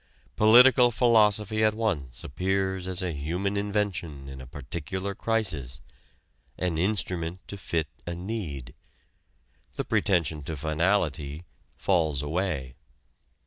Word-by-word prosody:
Political 125 +3 +7
philosophy 110 -2 +3
at 110 0 +3
once 75 - -2
appears 95 +3 -1
as 95 0 0
a 90 -2 -2
human 90 +8 -2
invention 100 -9 -2
in 65 -1 -8
a 65 - -10
particular 85 +9 -5
crisis 80 - -2 0.8
an 85 -3 -1
instrument 90 -3 -1
to - - -6
fit 85 -5 -2 0.2
a 85 - -3
need. 85 - -5 1.0
The - - -2
pretension 85 -6 +1
to 80 0 -4
finality 80 -1 0 0.3
falls 80 -7 +1
away. 75 -5 -2
90 Hz, 110 wpm, -27 LUFS, 75-105 Hz, 1.0 s, Political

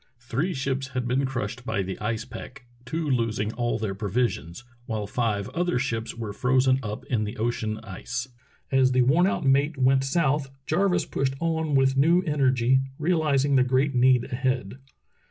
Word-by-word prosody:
Three 125 +9 -2
ships 135 0 -2
had 125 -1 -1
been 130 +2 +1
crushed 125 -2 -4
by 100 -6 -1
the 95 0 -5
ice 110 +2 -2
pack, 130 +1 -10 0.2
two 160 +5 -3
losing 115 -4 0
all 120 -1 -1
their 110 -3 -3
provisions, 100 - -2 0.2
while 110 -2 -2
five 105 -2 -1
other 175 -3 0
ships 120 -3 -2
were 110 -3 -5
frozen 130 +3 +2
up 105 -3 -6
in 115 -4 0
the 105 - -5
ocean 110 -1 -1
ice. 125 +5 -5 0.4
As 130 -1 +4
the 125 0 +4
worn 160 +9 +4
out 195 - -1
mate 140 +3 +2
went 130 +1 +3
south, 145 -1 +1 0.2
Jarvis 180 +3 +1
pushed 135 -1 -1
on 160 -3 0
with 135 0 +3
new 165 +6 +4
energy, 130 -5 +2 0.2
realizing 150 -4 +2
the 130 - +5
great 130 +3 +1
need 125 -1 +4
ahead. 125 -3 -2
130 Hz, 170 wpm, -26 LUFS, 115-140 Hz, 0.4 s, the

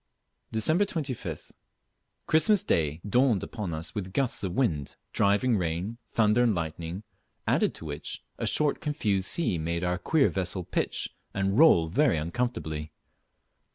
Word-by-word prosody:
Dec.25th. 155 - 0 0.7
Christmas 195 +6 +4
day 80 0 0
dawned 120 -2 +3
upon 100 -5 -5
us 80 +1 -4
with 95 -3 -5
gusts 130 -3 0
of 95 -3 -2
wind, 85 - 0 0.2
driving 105 +4 +3
rain, 90 +7 -3
thunder 110 +1 +3
and 115 -4 +3
lightning, 85 +3 -4 0.4
added - - +2
to - - -9
which 75 -1 -5 0.2
a - - -1
short 150 -2 +1
confused 105 -11 0
sea 125 - 0
made 85 +2 -2
our 90 +1 0
queer 145 - +3
vessel 90 -1 -2
pitch - - -2 0.2
and 95 +4 +1
roll 90 - +6
very 130 - +2
uncomfortably. 80 -4 -3
100 Hz, 135 wpm, -28 LUFS, 85-125 Hz, 0.7 s, roll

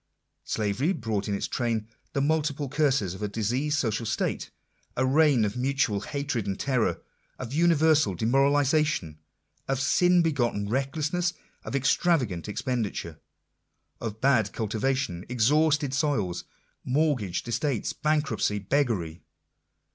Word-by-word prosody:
Slavery 110 - 0
brought 110 - -2
in 100 - 0
its - - -2
train 115 -3 -1 0.3
the 140 - 0
multiplied 150 -2 0
curses 135 - +1
of 95 - -9
a 105 - -1
diseased 125 +9 -1
social 115 -3 -1
state; - - -2 0.5
a 130 - +2
reign 140 -4 +4
of 105 - -3
mutual 130 -4 0
hatred 135 -1 -3
and 95 -1 -3
terror; 130 -5 0 0.3
of 130 0 -6
universal 155 - +3
demoralization; 135 - +2 0.5
of 135 -1 0
sin 180 +5 +4
begotten 120 -10 0
recklessness; 150 - -1 0.3
of - - -5
extravagant 130 - +1
expenditure; 105 - -3 0.8
of 110 -2 -5
bad 130 -6 +3
cultivation, 110 -3 -1
exhausted 145 +4 +2
soils, 135 - -1 0.4
mortgaged 125 - 0
estates, 120 +1 -1
bankruptcy, 150 -9 0
beggary. 100 - -1
130 Hz, 115 wpm, -27 LUFS, 105-145 Hz, 0.8 s, reign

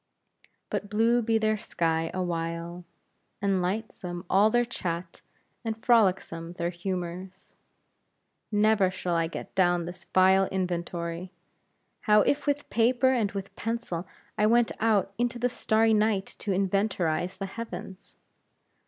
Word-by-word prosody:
But 205 - -2
blue 230 +3 +3
be 225 0 +2
their 215 -1 +1
sky 165 -4 -1
awhile, 170 -1 -3 0.5
and 195 -2 +1
lightsome 180 -2 -4
all 200 +3 +5
their 240 +2 +2
chat, 175 -7 -5 0.4
and 220 -1 -3
frolicsome 185 -7 +2
their 175 -1 -2
humors. 185 +1 -5 1.0
Never 210 -2 +4
shall 185 -1 -3
I 165 -1 +1
get 165 - -8
down 175 -2 +3
the 175 +1 -8
vile 190 +1 +5
inventory! 175 -1 -3 0.8
How, 210 0 +7
if 285 +7 0
with 290 0 0
paper 245 +3 +3
and 225 -6 +1
with 195 -1 -6
pencil 220 -6 -3 0.3
I 210 - +4
went 235 +1 +4
out 210 -3 +2
into 240 0 0
the 245 +1 +1
starry 225 -1 +2
night 210 -2 +2
to 210 - -6
inventorize 190 -2 0
the 195 - -3
heavens? 195 -2 -8
190 Hz, 130 wpm, -27 LUFS, 175-220 Hz, 1.0 s, How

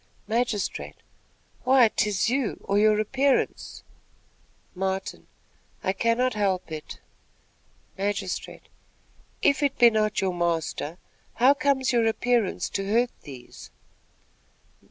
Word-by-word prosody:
Magistrate. 230 -2 -2 0.7
"Why, 255 -2 +6
'tis 210 -3 0
you, 250 -2 -1
or 200 +1 +1
your 215 0 +4
appearance." 270 +5 0 0.9
Martin. 190 +1 -4 0.6
"I 190 - +1
cannot 230 +5 +1
help 195 -5 -1
it." 155 -1 -7 1.0
Magistrate. 195 -1 -3 0.8
"If 280 +1 +3
it 280 -1 0
be 240 -1 +7
not 215 -1 +1
your 190 -1 0
master, 170 -2 -2 0.4
how 255 +4 +5
comes 280 -3 +1
your 230 -2 +3
appearance 230 -2 0
to 195 0 -3
hurt 240 +2 +2
these?" 130 -4 -12
215 Hz, 105 wpm, -25 LUFS, 190-245 Hz, 1.0 s, be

